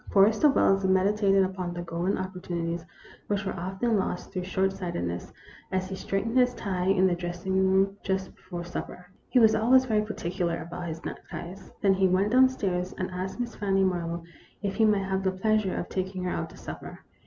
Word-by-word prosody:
Forrester 215 +8 +5
Wells 195 -7 +3
meditated 195 +1 +3
upon 185 -2 -3
the 175 - -4
golden 175 +3 -1
opportunities 175 -3 -3 0.4
which 200 -1 -1
were 190 - -2
often 190 +5 0
lost 185 0 -3
through 180 -2 -3
short 190 +1 +1
sightedness, 85 - -4 0.4
as 185 0 0
he 190 - -4
straightened 225 +6 0
his 250 0 +3
tie 185 -2 -2
in 190 -1 +4
the 185 - +3
dress 175 +1 -5
ing 190 - 0
room, 190 +1 +3
just 190 -1 -2
before 175 -2 -7
supper. 180 +1 -6 0.2
He - - +2
was 220 -3 +7
always 255 +4 +5
very 215 -4 +2
particular 175 -5 -2
about 175 +1 -6
his 165 0 -6
neckties. 180 +3 -7
Then 195 -1 +5
he 190 0 +3
went 190 +3 +2
down 260 +1 +7
stairs, 185 -7 -2
and 185 0 -3
asked 185 +4 -4
Miss 240 -1 -3
Fanny 195 -2 +1
Marlowe 170 -2 -1 0.4
if 200 -1 -1
he 220 - +3
might 205 -2 +3
have 190 0 -1
the 190 - +1
pleasure 210 0 +1
of - - -3
taking 190 0 -3
her 180 - -1
out - - -3
to - - -14
supper. - - -8
190 Hz, 200 wpm, -27 LUFS, 180-200 Hz, 0.4 s, was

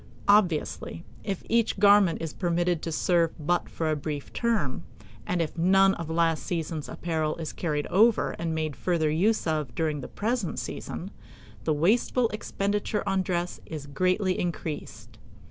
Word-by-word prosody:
Obviously, 180 -4 +2 0.2
if 195 -3 -3
each 230 -2 +2
garment 200 -4 +5
is 160 - -4
permitted 175 -2 0
to 165 - -4
serve 165 +1 +2
for - - -22
but 175 +2 +1
a 155 -1 +2
brief 145 -1 -5
term, 225 - 0 0.5
and 175 -2 +1
if 155 - -6
none 195 +2 +5
of 165 -3 -6
last 165 -1 +2
season's 160 -3 -3
apparel 160 -2 -1
is 160 -2 -5
carried 150 -4 -1
over 220 +4 +3
and 165 -1 -1
made 155 -2 -2
further 165 -4 0
use 205 +8 +2
of 155 -7 -1
during 155 -1 -1
the - - -6
present 220 -3 -2
season, - - -5 0.5
the 155 - +2
wasteful 225 - +2
expenditure 205 0 -2
on 195 -1 +2
dress 180 -2 -2
is 155 -3 -6
greatly 185 +6 +1
increased. 165 -3 -5
170 Hz, 155 wpm, -27 LUFS, 155-195 Hz, 0.5 s, garment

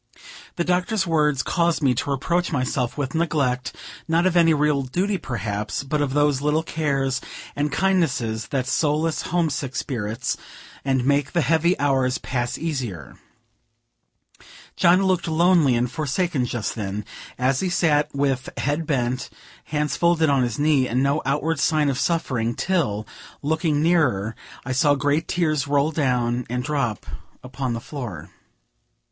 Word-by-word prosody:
The 170 - 0
Doctor's 180 +4 +1
words 150 -6 +2
caused 170 0 +1
me 130 -2 +4
to 125 - -3
reproach 170 +7 0
myself 130 -3 -1
with 135 -2 -2
neglect, 145 -7 0 0.3
not 165 +2 +2
of 185 -1 +2
any 165 -1 +5
real 150 -2 +2
duty 185 +9 -1
perhaps, 105 -3 -3
but 145 +2 -1
of 140 -1 -1
those 145 -2 +2
little 150 +2 +1
cares 135 -5 -1 0.3
and 145 +1 -1
kindnesses 140 - 0
that 130 -2 -1
solace 155 +4 +1
homesick 145 -7 -1
spirits, 115 -1 -2 0.5
and 130 -2 +1
make 140 0 +1
the 170 - +2
heavy 165 +5 +2
hours 135 -3 +2
pass 120 -2 -3
easier. 120 - -4 1.6
John 180 +3 +4
looked 185 -3 +1
lonely 165 -4 +4
and 120 +1 0
forsaken 150 -2 -1
just 120 -3 -3
then, 105 -1 -4 0.3
as 130 +1 +1
he 190 - 0
sat 155 -5 +2
with 135 -2 -1
bent 150 +3 -2
head, 125 -2 -1 0.4
hands 150 -1 -1
folded 170 -3 +3
on 135 -2 +3
his 120 -3 -1
knee, 145 -3 +3
and 125 +3 0
no 140 +2 +1
outward 150 +3 0
sign 155 -1 +2
of 135 -1 -1
suffering, 125 -10 0
till, 140 - 0 0.4
looking 155 0 +1
nearer, 130 - +2 0.3
I 130 - -3
saw 145 +3 +3
great 145 +3 0
tears 155 -6 0
roll 145 +2 +2
down 125 -5 0
and 125 +1 -2
drop 135 -6 -2 0.4
upon 130 -1 -3
the 115 - -3
floor. 120 - -7
145 Hz, 150 wpm, -23 LUFS, 125-160 Hz, 1.6 s, any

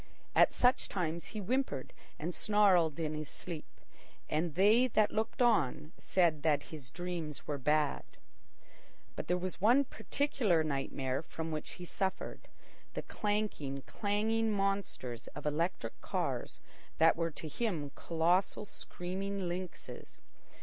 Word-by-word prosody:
At - - +6
such 250 +1 +3
times 170 -3 -2
he 215 - -6
whimpered 245 - -1 0.2
and 170 +4 -3
snarled 185 -8 +4
in 155 -2 -1
his 155 -1 -4
sleep, 165 -4 -7 0.5
and 155 0 0
they 215 +7 +6
that 215 -3 +3
looked 220 +3 0
on 155 - +2
said 170 -5 +2
that 150 -2 +2
his 140 -5 -8
dreams 170 -1 -4
were 145 -2 -2
bad. 150 +1 +2 1.1
But - - -5
there 180 - +2
was 180 0 -4
one 245 +7 +6
particular 240 - +1
nightmare 135 -2 -1
from 160 0 -5
which 155 -1 -4
he 180 - -8
suffered—the 190 +2 -5
clanking, 205 -11 -2
clanging 220 +2 +1
monsters 195 - -1
of 150 - -7
electric 150 -5 -1
cars - - -2 0.4
that 165 0 +6
were 165 0 0
to 160 0 -7
him 155 - -2
colossal 175 +5 +1
screaming 190 0 -4
lynxes. 180 0 -6
175 Hz, 130 wpm, -33 LUFS, 155-205 Hz, 1.1 s, At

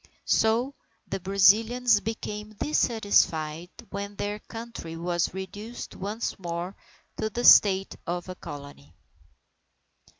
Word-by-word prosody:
So 230 +5 +2 0.3
the 195 - -3
Brazilians 215 +5 +4
became 215 -1 -5
dissatisfied, 180 - +1 0.2
when 200 +1 -5
their 205 +1 -3
country 225 -8 -8
was 175 0 0
reduced 205 +5 -7
once 210 +4 -4
more 175 +1 -4 0.4
to 220 - -1
the 240 +3 -3
state 195 -4 +6
of 175 +1 -3
a 185 - -5
Colony. 140 - -10
200 Hz, 105 wpm, -27 LUFS, 175-220 Hz, 0.4 s, state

